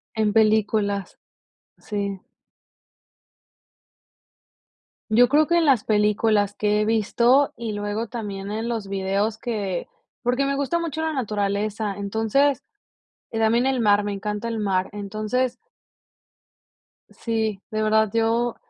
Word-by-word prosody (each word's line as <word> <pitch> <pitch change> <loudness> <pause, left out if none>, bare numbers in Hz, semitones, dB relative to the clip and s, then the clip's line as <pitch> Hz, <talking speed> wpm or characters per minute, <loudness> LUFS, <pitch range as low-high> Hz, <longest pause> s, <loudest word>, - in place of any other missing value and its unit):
En 215 -1 +1
películas, 215 -2 +1 0.6
sí. 200 -2 -4 2.9
Yo 245 +3 +6
creo 300 +4 +4
que 340 +2 +2
en 335 - +3
las 265 -7 +4
películas 210 -1 +2
que 210 0 +1
he 210 - +1
visto, 235 +5 +3
y 230 -2 -4
luego 205 +2 -3
también 200 -4 -6
en 220 +2 -3
los 225 -4 -3
videos 200 +3 -1
que 205 -7 -3 0.3
porque 250 +3 +1
me 275 0 0
gusta 280 +5 0
mucho 320 -2 -3
la 320 0 -1
naturaleza. 210 -4 -2
Entonces, 225 +8 +1 0.7
también 225 +2 +2
el 265 -1 +1
mar, 205 -2 +4
me 205 - -2
encanta 210 +3 -3
el 225 - -3
mar, 190 -3 0
entonces 215 +5 -2 1.5
Sí, 220 -4 -2
de 215 0 -1
verdad 220 0 +3
yo 230 +1 +1
220 Hz, 120 wpm, -23 LUFS, 205-235 Hz, 2.9 s, Yo